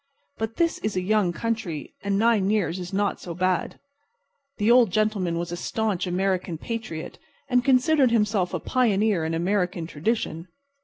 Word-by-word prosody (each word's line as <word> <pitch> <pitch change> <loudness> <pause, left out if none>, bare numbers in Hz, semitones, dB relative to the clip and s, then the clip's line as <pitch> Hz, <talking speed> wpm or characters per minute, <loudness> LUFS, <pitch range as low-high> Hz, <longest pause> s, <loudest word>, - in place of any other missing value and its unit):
But 220 0 -3
this 335 +3 +1
is 215 -1 -3
a 185 - +1
young 200 -1 +2
country, 190 -6 -3
and 200 0 0
nine 215 -3 +3
years 200 -4 0
is 180 -1 -6
not 200 +1 -1
so 170 -2 -6
bad. 185 0 -1 0.8
The 210 +2 +3
Old 240 -3 +6
Gentleman 200 -4 0
was 170 0 -3
a - - -2
staunch 195 0 -2
American 180 -1 -1
patriot, 220 -5 -6 0.3
and 250 -2 +2
considered 265 +1 +4
himself 210 -5 +1
a - - -2
pioneer 215 -7 +1
in 165 +1 -1
American 180 0 0
tradition. 165 0 -2
200 Hz, 160 wpm, -25 LUFS, 180-225 Hz, 0.8 s, Old